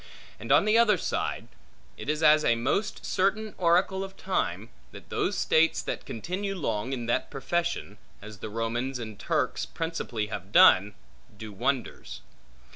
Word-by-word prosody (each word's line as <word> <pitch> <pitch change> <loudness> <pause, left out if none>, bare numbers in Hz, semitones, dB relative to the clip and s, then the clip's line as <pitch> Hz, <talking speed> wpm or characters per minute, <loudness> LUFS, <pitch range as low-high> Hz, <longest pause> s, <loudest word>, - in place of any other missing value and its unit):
And 115 +5 -5
on 145 +7 +6
the 215 +2 +4
other 230 -2 +4
side, - - -3 0.5
it - - -7
is 155 +1 -1
a 150 -6 +5
most 140 - -1
certain 210 +3 0
oracle 185 +2 +2
of 195 0 -9
time, 110 - -2 0.2
that - - -13
those - - -1
states 165 +1 +3
that - - -5
continue 185 - -4
long 115 - -2
in 125 -3 -3
that 120 - -1
profession 145 - -3 0.2
(as 105 -1 -11
the - - -6
Romans 120 +4 -2
and 110 -4 -8
Turks - - -1
principally 160 -10 -3
have 100 -2 -7
done) 100 +1 +6 0.4
do 110 0 -8
wonders. 130 +5 -3
135 Hz, 150 wpm, -27 LUFS, 110-180 Hz, 0.5 s, on